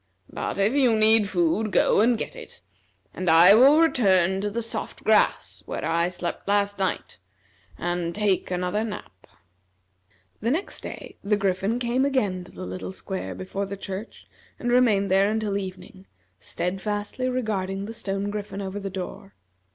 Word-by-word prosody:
But - - -3
if 200 +4 +2
you 260 -5 +4
need 215 -1 +4
food, 185 +4 +1
go - - +4
and 235 +1 +3
get - - -5
it, - - -11 0.5
and 185 0 -2
I 170 +4 +8
will 270 +7 +7
return 190 - +3
to 205 - -1
the 230 +3 -3
soft 230 - -6
grass - - +2
where - - -4
I 170 +1 +1
slept 180 0 -5
last 205 0 +1
night 190 - -2 0.6
and 175 -1 -2
take 205 -3 0
another 180 +4 -1
nap." 215 -2 -8 1.1
The 230 - -1
next 325 +10 -2
day - - -9
the 205 +1 +2
Griffin 195 +3 0
came 245 +1 0
again 210 -10 0
to 185 - -15
the - - -8
little 90 0 -6
square 95 0 -5
before 145 - -4
the 200 0 -6
church, 195 +2 -7 0.3
and 240 - -2
remained 215 -6 +3
there 195 +1 +4
until 215 -2 -1
evening, 190 -1 -7 0.3
steadfastly 205 - -3
regarding 200 -6 -2
the 225 - -7
stone 200 -2 -3
griffin 205 -1 -5
over 195 0 -4
the 195 -1 -5
door. 190 +1 -7
200 Hz, 160 wpm, -25 LUFS, 185-220 Hz, 1.1 s, I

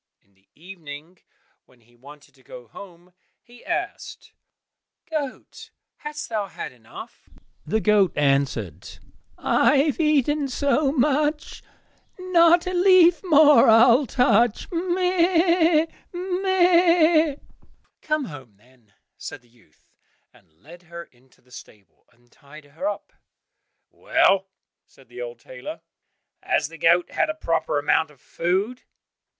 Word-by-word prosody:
In 100 - -38
the 95 0 -37
evening 165 -1 -12 0.5
when 125 -2 -27
he 120 +1 -28
wanted 145 +4 -17
to 135 - -25
go 125 -2 -13
home, 180 - -15 0.3
he 240 0 -20
asked, - - -6 0.7
"Goat, 300 -5 -7 0.3
hast 300 0 -7
thou 215 -3 -3
had - - -8
enough?" 120 -3 -14 0.4
The 220 +7 -1
goat 205 -4 +3
answered, 135 - -2 0.4
"I - - +2
have 290 +3 0
eaten 295 -2 +1
so 280 +2 0
much, 295 +2 -1 0.6
Not 345 -2 +3
a 365 - -4
leaf 360 -1 +4
more 300 -8 +5
I'll 235 +4 +5
touch, 235 -2 +1
meh! 345 -2 +1 0.3
meh!" 350 -4 +2 0.7
"Come 305 -2 -2
home, 130 - -12
then," 120 -2 -28 0.3
said 135 - -9
the 120 - -28
youth, 115 -10 -29 0.5
and - - -25
led 170 +5 -15
her 170 -1 -10
into 130 -3 -28
the 125 - -29
stable, 100 -7 -16
and 120 0 -32
tied 145 +1 -16
her 160 +7 -6
up. 205 0 -8 0.8
"Well," 195 0 +1 0.4
said 135 -3 -23
the 125 0 -10
old 120 -1 -7
tailor, 125 +1 -10 0.6
"has - - -1
the 165 -1 -14
goat 170 +3 +2
had 325 - -1
a 310 - -3
proper 165 - -2
amount 150 +2 +1
of 145 -3 -22
food?" 195 - -3
205 Hz, 125 wpm, -22 LUFS, -, 0.8 s, more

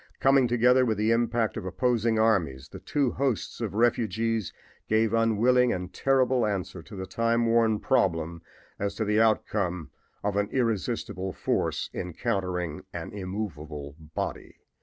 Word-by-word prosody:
Coming 135 -1 +4
together 125 +2 +4
with 110 -4 0
the 110 +2 +2
impact 115 -1 +1
of - - -4
opposing 115 +1 +1
armies 85 -12 +1
the - - -9
two 140 -4 0
hosts 135 -6 -2
of - - -3
refugees 115 -2 +1 0.4
gave 110 0 +2
unwilling 115 +2 +3
and 90 -2 -4
terrible 130 -1 +2
answer 95 -4 -2
to 100 - -12
the 95 -1 -5
time 115 +4 +1
worn 115 -2 +3
problem 85 -3 0 0.4
as 100 0 -2
to 110 - -1
the 105 +1 +3
outcome 90 - 0 0.3
of 100 0 0
an 100 0 +1
irresistible 110 -5 -1
force - - -1
encountering 90 -3 -3
an - - -6
immovable 80 -8 -5
body. 75 -1 -5
110 Hz, 140 wpm, -27 LUFS, 95-115 Hz, 0.4 s, Coming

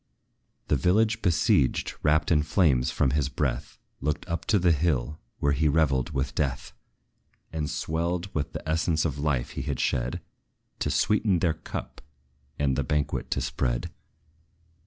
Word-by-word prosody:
The - - +3
village 110 - +2
besieged, 80 -7 +2
wrapped 75 +2 +2
in 75 -2 +5
flames 75 -6 +2
from 65 - +1
his 70 -1 +1
breath, - - -2 0.2
Looked 75 +2 -2
up 85 0 -3
to 105 - +3
the 90 -2 +3
hill, 75 -2 0 0.2
where 70 - +1
he 75 +3 +2
revelled 70 -4 +2
with 65 -3 -2
death, 65 -3 -2 0.8
And 75 -2 -2
swelled 85 +5 -2
with 75 -2 -2
the - - -6
essence 80 0 +1
of 70 -3 -2
life 70 -5 0
he - - -4
had - - -3
shed, 60 0 0 0.6
To - - -1
sweeten 105 -3 +2
their 85 -1 +1
cup, 80 - -7 0.6
and 70 -2 +1
the 70 - 0
banquet 75 +2 -1
to - - 0
spread. - - -1
75 Hz, 155 wpm, -27 LUFS, 70-85 Hz, 0.8 s, in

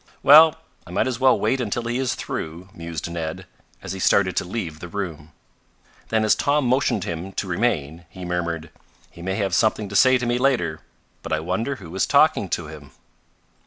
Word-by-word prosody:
"Well, 155 +2 +8 0.3
I - - -12
might - - 0
as 125 -2 -3
well 130 -1 +4
wait 130 -1 +1
until 120 +1 -2
he 120 +2 -2
is 130 -2 -1
through," 85 +4 -6
mused 85 -2 -6
Ned, 85 -2 -5 0.4
as 95 - -6
he 95 - -6
started 95 -1 +3
to - - +2
leave 90 -5 -5
the 90 - -7
room. 85 -5 -6 0.8
Then 110 -1 +1
as 110 - +5
Tom 145 -1 +1
motioned 125 -5 +1
to - - -5
him 85 +3 -5
to 100 - -3
remain, 85 -5 -1
he 90 +1 -9
murmured: 85 -2 -3 0.4
"He 85 - -13
may 95 +2 -2
have 100 -2 -1
something 110 -2 +2
to 100 - -7
say 130 +4 +6
to 125 - -3
me 120 +1 0
later. 120 - +1 0.4
But - - -4
I 80 - +1
wonder 95 - -2
who 85 -8 -11
is 95 - +1
talking 145 - +3
to 85 - -2
him." 75 -2 -11
95 Hz, 200 wpm, -23 LUFS, 85-120 Hz, 0.8 s, Well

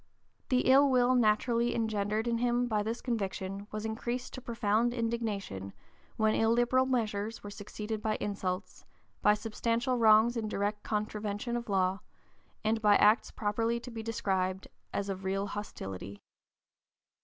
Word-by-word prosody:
The 255 -2 +3
ill 275 +2 +6
will 255 -1 +4
naturally 235 +1 +2
engendered 220 0 -1
in 230 -1 0
him 245 0 +1
by 215 -3 +1
this 225 +3 -3
conviction 200 -4 -3
was 215 0 -4
increased 240 +3 -3
to 255 - -7
profound 235 0 +1
indignation 215 - -3 0.4
when 215 0 +3
illiberal 240 +3 +3
measures 220 -3 -1
were 205 - -7
succeeded 210 +1 -5
by 215 0 0
insults, 195 -1 -3 0.4
by 210 0 +5
substantial 230 +3 -1
wrongs 220 +1 +6
in 225 -2 -2
direct 205 0 -2
contravention 210 +1 -3
of 235 -2 -4
law, 190 -1 +1 0.6
and 220 +1 +1
by 210 -1 +5
acts 210 +3 +4
properly 225 +2 -1
to 245 +1 -9
be 225 -1 -5
described 190 -4 -1 0.2
as 200 - -2
of 190 -1 -4
real 195 +1 -1
hostility. 100 - -7
220 Hz, 145 wpm, -31 LUFS, 205-235 Hz, 0.6 s, ill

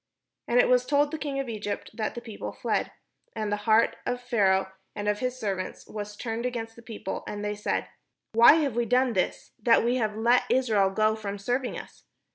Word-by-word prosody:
And 245 - +3
it - - +5
was 250 0 +3
told 290 +1 +3
the 315 - -4
king 280 -3 -3
of 270 - -3
Egypt 210 -3 -4
that 215 - -3
the 240 - -5
people 225 -3 -6
fled; - - -1 0.4
and 215 -2 -2
the - - +2
heart 220 +1 +4
of 245 0 -2
Pharaoh 195 -6 +2 0.2
and 205 0 -4
of 210 0 +1
his 255 0 -2
servants 195 -4 -3
was 210 -1 -6
turned 225 +1 -4
against 230 -2 -4
the 235 - -13
people, 220 -4 -6
and 205 0 -4
they 210 - -1
said, 210 0 -2 0.4
"Why 230 +4 +8
have 295 -7 +1
we 240 0 +1
done 250 +1 +2
this, 185 -3 -1
that 235 -3 +5
we 245 +2 +2
have 215 -3 -1
let 235 +3 +3
Israel 220 -7 +3
go 215 +3 +2
from 205 -2 -5
serving 245 +5 -2
us?" - - -11
225 Hz, 210 wpm, -27 LUFS, 210-250 Hz, 0.4 s, Why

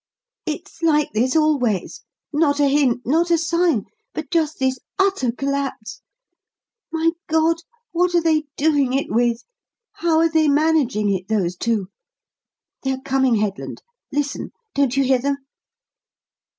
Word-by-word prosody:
"It's 315 +1 -6
like 300 -3 +2
this 245 +6 +1
always; 280 - +1 0.3
not 290 -1 +2
a 290 - +4
hint, 270 -4 +2
not 330 +7 +2
a 340 - +4
sign, 335 - +1 0.3
but 315 +1 -5
just 315 -3 +1
this 260 -1 0 0.2
utter 385 -11 +2
collapse. 275 -4 -3 0.9
My 325 0 +2 0.2
God, 320 +1 +2 0.3
what 350 +1 +1
are 345 - +4
they 315 -2 +2
doing 285 -4 +2
it 275 +1 -1
with? 235 +1 +1 0.5
How 335 -2 +1
are 330 +1 +5
they 315 -1 +3
managing 280 -9 +2
it, 185 -1 -4
those 190 -5 0
two? 210 -1 -1 0.9
They're 265 -1 -1
coming, 265 -3 +2
Headland. 210 -2 -3 0.3
Listen! 285 0 -2 0.2
Don't 275 -2 +1
you 275 - +4
hear 260 -1 +3
them?" 280 +2 0
280 Hz, 135 wpm, -21 LUFS, 245-320 Hz, 0.9 s, are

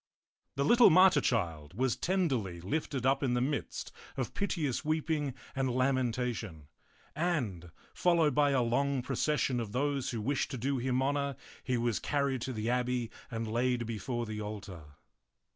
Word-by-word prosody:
The 140 +1 +1
little 240 - +7
martyr 185 -3 +6
child 85 - -1
was 130 +2 +1
tenderly 135 - 0
lifted 130 - -2
up 135 +1 +3
in 125 -3 +1
the - - +2
midst 140 +4 -2 0.3
of 130 -3 -2
piteous 160 -11 -1
weeping 155 -3 -1 0.2
and 135 -1 0
lamentation, 125 - -1 0.5
and, 125 - -1 0.2
fol 175 -1 +3
lowed 155 -4 +3
by 145 +1 +4
a 135 -3 +2
long 135 +2 +1
procession 135 -1 0
of 110 -3 -5
those 140 0 0
who 115 - -3
wished 135 +6 0
to 130 - -4
do 135 +3 -1
him 130 +1 0
honor, 140 0 0 0.3
he 125 -2 0
was 115 -2 0
carried 140 -3 0
to 130 - -3
the 110 -2 -3
abbey 125 -1 0 0.2
and 115 -2 -3
laid 120 +1 0
before 115 +2 -3
the 110 -1 -5
altar. 100 -6 -7
130 Hz, 160 wpm, -31 LUFS, 115-140 Hz, 0.5 s, little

